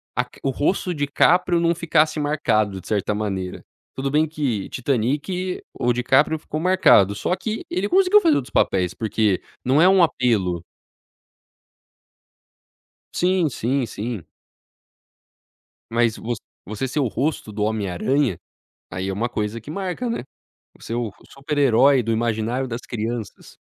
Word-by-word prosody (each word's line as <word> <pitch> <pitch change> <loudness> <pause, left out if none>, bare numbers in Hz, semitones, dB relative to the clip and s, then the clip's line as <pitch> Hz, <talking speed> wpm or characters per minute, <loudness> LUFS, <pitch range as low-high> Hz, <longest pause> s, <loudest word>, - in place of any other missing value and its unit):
a 125 - +2
car 125 - -19
o 135 - +1
rosto 180 +6 0
DiCáprio 170 +4 +2
não 170 0 +2
ficasse 155 -2 +1
marcado 110 -10 0
de - - -13
certa 105 -1 0
maneira. 95 -3 -4 0.3
Tudo 135 +1 -2
bem 155 +2 +3
que 140 -10 -2
Titanic 145 - -1
o 120 - 0
DiCáprio 130 +6 +2
ficou 155 0 -5
marcado, 170 - +4
só 180 - -1
que 215 +4 -4
ele 200 +3 -1
conseguiu 390 +2 +5
fazer 325 -3 +4
outros 125 - -3
papéis 90 -2 +1
porque 110 -3 0 0.2
não 135 +5 +4
é 185 - +7
um 190 -2 +5
apelo. 100 - +1 2.5
Sim, 180 -2 +2
sim, 125 +1 -1
sim. 110 -3 -5 1.7
Mas 115 -1 +2 0.5
você 110 +5 -4
ser 140 +4 -2
o 130 - +1
rosto 135 -1 -2
do 105 0 -1
Homem 105 -3 -1
Aranha, 130 - 0 0.5
aí 95 +2 -3
é, 95 - -2
uma 115 +5 -1
coisa 105 0 -3
que 145 - -9
marca, 195 +7 -3
né, 230 - -3 0.6
você 115 - -7
é - - -1
o 120 -4 -2 0.2
super-herói 135 -1 +3
do 115 0 -2
imaginário 115 +3 -1
das 115 +1 -4
crianças. 115 -1 -5
125 Hz, 145 wpm, -22 LUFS, 110-155 Hz, 2.5 s, é